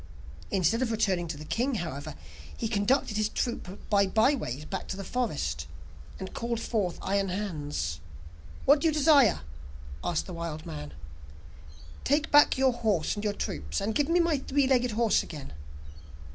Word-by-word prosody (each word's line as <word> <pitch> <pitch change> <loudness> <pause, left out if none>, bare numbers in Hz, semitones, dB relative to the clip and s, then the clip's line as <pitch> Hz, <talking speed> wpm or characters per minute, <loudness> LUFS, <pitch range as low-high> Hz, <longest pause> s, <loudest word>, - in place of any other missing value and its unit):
Instead 200 +5 +2
of 245 -3 0
returning 190 -6 +1
to 160 -2 -5
the 155 - -9
king, 245 - 0
however, 155 -5 -4 0.4
he 230 - -2
conducted 215 +1 +1
his 215 0 +1
troop 205 -5 -4
by 200 -2 +3
byways 215 - +1
back 190 - -5
to 190 - -4
the 195 - -5
forest, 185 - -2 0.5
and 190 - -6
called 235 -1 -2
forth 205 -6 -1
Iron 195 0 +1
Hans. 150 - -3 0.7
'What 285 +1 +6
do 330 - +3
you - - +3
desire?' 290 - +5 0.6
asked 170 - 0
the 185 - -8
wild 165 -1 -5
man. 150 -3 -7 1.1
'Take 295 +3 +1
back 290 -2 +6
your 260 -1 +3
horse 215 -9 0
and 205 - -5
your 210 -1 0
troops, 75 - -3
and 210 +3 -1
give 290 +6 +1
me 345 +1 +4
my 335 -4 +2
three 275 +1 +1
legged 250 -3 +2
horse 225 0 +3
again. 145 - -8
210 Hz, 165 wpm, -28 LUFS, 170-250 Hz, 1.1 s, What